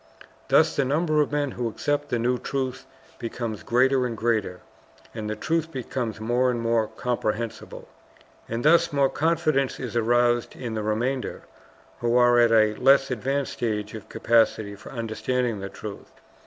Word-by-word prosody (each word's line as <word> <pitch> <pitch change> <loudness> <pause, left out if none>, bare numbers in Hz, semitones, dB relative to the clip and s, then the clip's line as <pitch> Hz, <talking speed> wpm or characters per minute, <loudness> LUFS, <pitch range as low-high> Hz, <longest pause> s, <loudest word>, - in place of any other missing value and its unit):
Thus - - +4
the 140 - +2
number 155 +3 +1
of 150 - -1
men 145 -2 0
who 120 -1 -3
accept 145 +6 -2
the 120 - 0
new 125 +2 0
truth 135 -1 -4 0.3
becomes 115 -2 -4
greater 130 +1 +2
and 115 -2 -5
greater, 105 -6 -1 0.5
and 110 -2 -5
the 110 - -2
truth 165 +4 -1
becomes 125 -4 -4
more 120 +3 +1
and 120 -1 -1
more 115 -1 +1
comprehensible. 115 0 -4 0.6
And 115 +3 -3
thus 170 +2 +5
more 140 -2 +3
confidence 155 -4 0
is 125 -3 -5
aroused 120 +1 +2
in 120 -3 -5
the 110 - -2
remainder, 120 +5 -2 0.6
who 120 0 +1
are 120 0 +5
at 120 -1 +5
a 110 -1 +4
less 135 +1 +4
advanced 135 +3 -1
stage 105 -3 -3
of 110 -3 -9
capacity 110 -3 +2
for 95 - -12
understanding 115 0 -2
the 100 0 -5
truth. 105 0 -9
120 Hz, 160 wpm, -25 LUFS, 110-135 Hz, 0.6 s, thus